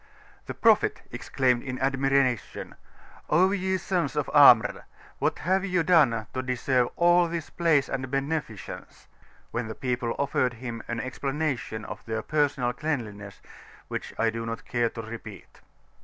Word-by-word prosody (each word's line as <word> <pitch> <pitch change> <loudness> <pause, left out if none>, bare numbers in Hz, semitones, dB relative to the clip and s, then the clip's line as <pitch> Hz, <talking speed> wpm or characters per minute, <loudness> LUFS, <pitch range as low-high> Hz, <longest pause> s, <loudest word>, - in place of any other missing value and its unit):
The - - -5
Prophet - - +3
exclaimed 125 -2 0
in 130 -2 -5
admiration, 135 -2 0 0.6
"O 185 +5 +4
ye 190 -1 0
Sons 180 -5 -1
of 150 - -1
Amr! 140 -6 +6 0.3
what - - 0
have 190 +3 +1
ye 185 -3 +1
done 140 -10 +4
to 130 - -1
deserve 125 -1 0
all 175 0 +4
this 165 -2 -5
Praise 165 -5 +2
and 130 -1 -4
Beneficence?" 140 - -4 0.5
when 120 -1 -3
the 110 - -6
people 125 -3 -2
offered 130 -3 0
him 120 -1 -6
an 120 0 -3
explanation 135 -4 -3
of 105 +1 -8
their 110 -1 -2
personal 140 -5 0
cleanliness 110 -9 -5 0.5
which - - -5
I 115 0 +2
do 115 0 -4
not 115 +1 -5
care 120 -2 0
to 115 - -7
repeat. 115 +1 -10
130 Hz, 145 wpm, -26 LUFS, 115-155 Hz, 0.6 s, Amr